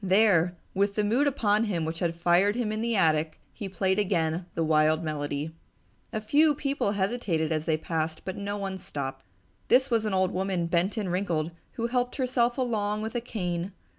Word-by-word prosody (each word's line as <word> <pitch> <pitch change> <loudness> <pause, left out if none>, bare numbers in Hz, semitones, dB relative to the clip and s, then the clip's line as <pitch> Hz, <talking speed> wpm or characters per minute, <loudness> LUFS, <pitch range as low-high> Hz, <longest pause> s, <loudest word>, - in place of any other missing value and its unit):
There, 185 -3 +4 0.2
with 200 +1 +1
the 210 - +1
mood 240 +8 +2
upon 220 -5 +2
him 175 -7 -1
which 165 +1 -3
had 170 -1 0
fired 175 +4 +3
him 235 -3 -1
in 215 0 -2
the 235 0 0
attic, 155 -4 +2
he 205 -4 -6
played 190 +1 +1
again 175 -3 0
the 165 - +1
wild 155 +1 +3
melody. 145 0 -3 0.6
A 220 - -2
few 295 +8 +3
people 275 -8 -1
hesitated 190 -6 0
as 155 -1 -1
they 160 -2 +2
passed, 160 0 -3
but 190 - -4
only 200 0 -4
one 195 -2 -4
stopped. 135 -5 -5 0.4
This 260 +1 +4
was 225 -2 +2
an 210 - -1
old 185 -1 +2
woman, 185 -2 -1
bent 175 +5 0
and 200 -5 -1
wrinkled, 175 -4 -1 0.2
who 230 - -2
helped 245 +1 0
herself 245 -2 +1
along 215 -4 -1
with 220 - -4
a 240 - -1
cane. 180 -5 -3
190 Hz, 195 wpm, -27 LUFS, 165-220 Hz, 0.6 s, There